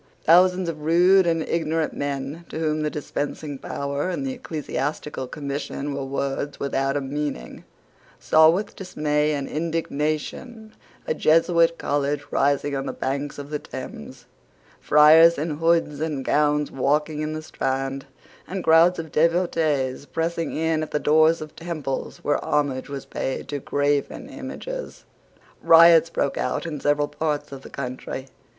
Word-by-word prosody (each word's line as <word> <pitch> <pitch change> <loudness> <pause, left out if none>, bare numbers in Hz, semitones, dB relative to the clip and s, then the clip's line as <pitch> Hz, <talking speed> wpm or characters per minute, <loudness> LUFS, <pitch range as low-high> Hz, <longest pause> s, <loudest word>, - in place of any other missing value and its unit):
Thousands 180 +2 +5
of 160 -2 -4
rude 175 +4 +4
and 165 -1 +1
ignorant 160 -1 -1
men, 140 +3 -4
to - - -6
whom 155 -1 0
the 150 - 0
dispensing 145 -1 -4
power 140 +5 -3
and 185 +9 -3
the 265 - -2
Ecclesiastical 150 - -4
Commission 140 0 -4
were 140 0 -3
words 140 +1 -3
without 135 0 0
a - - -1
meaning, 140 - -5 0.5
saw 160 0 +5
with 195 +5 -1
dismay 150 -5 -1
and 140 -2 -2
indignation 165 - -3 0.3
a 480 - 0
Jesuit 165 - +3
college 145 0 -1
rising 140 0 +1
on 135 0 -3
the - - -3
banks 140 +2 -3
of 145 +1 -8
the 150 - -2
Thames, - - -9 0.5
friars 160 +3 +6
in 150 0 -3
hoods 165 -3 +1
and 150 -4 -3
gowns 150 0 +1
walking 150 +3 0
in 155 0 -3
the 155 0 -5
Strand, 135 -1 -3 0.4
and 185 -1 -4
crowds 165 +3 +5
of 160 -2 -6
devotees 155 -5 +1
pressing 165 +3 -2
in 160 0 0
at 155 - -4
the - - 0
doors 155 +2 +3
of 155 -1 -9
temples 160 -5 -5
where 145 - 0
homage 145 -2 -1
was 140 -1 -6
paid 130 - -4
to 145 0 -3
graven 145 +1 -1
images. - - -7 0.6
Riots 165 0 +7
broke 140 -4 -1
out - - -2
in 155 -3 -4
several 145 +1 +1
parts 150 -2 -3
of 135 -1 -8
the - - -12
country. 130 0 -6
150 Hz, 150 wpm, -23 LUFS, 140-165 Hz, 0.6 s, Riots